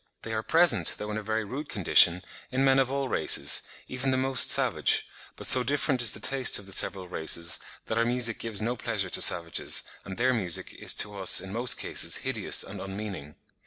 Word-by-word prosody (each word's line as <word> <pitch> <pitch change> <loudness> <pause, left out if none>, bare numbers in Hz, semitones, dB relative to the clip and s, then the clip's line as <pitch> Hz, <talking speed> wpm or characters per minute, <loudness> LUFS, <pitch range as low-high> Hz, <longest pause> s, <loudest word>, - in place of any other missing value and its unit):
They 110 - -7
are 110 - -3
present, 170 +9 +1
though 105 0 -7
in 105 - -5
a - - -8
very 110 +1 -4
rude 135 +8 -8
condition, 90 -2 +3 0.3
in 130 +1 -1
men 135 0 +2
of 130 -1 -1
all 140 -1 -3
races, 80 - +2 0.3
even 130 +1 -4
the 130 - -1
most 130 0 +4
savage; - - +1 0.3
but - - -6
so 130 - +6
different 135 0 -2
is 115 -3 +3
the - - -5
taste 135 -3 +4
of 100 - -10
the 95 - -6
several 95 -1 +2
races, 85 0 -1 0.3
that 110 - -3
our - - +2
music 120 -1 0
gives 110 -2 0
no 120 +2 -3
pleasure - - -4
to - - -2
savages, 85 -1 +1 0.2
and 95 -1 -10
their 130 +2 0
music 95 -8 -1
is - - -2
to 105 0 -1
us 95 -2 +4
in 95 0 -8
most 120 +2 0
cases - - 0
hideous - - +1
and - - -10
unmeaning. 95 -6 -9
110 Hz, 210 wpm, -26 LUFS, 95-130 Hz, 0.3 s, so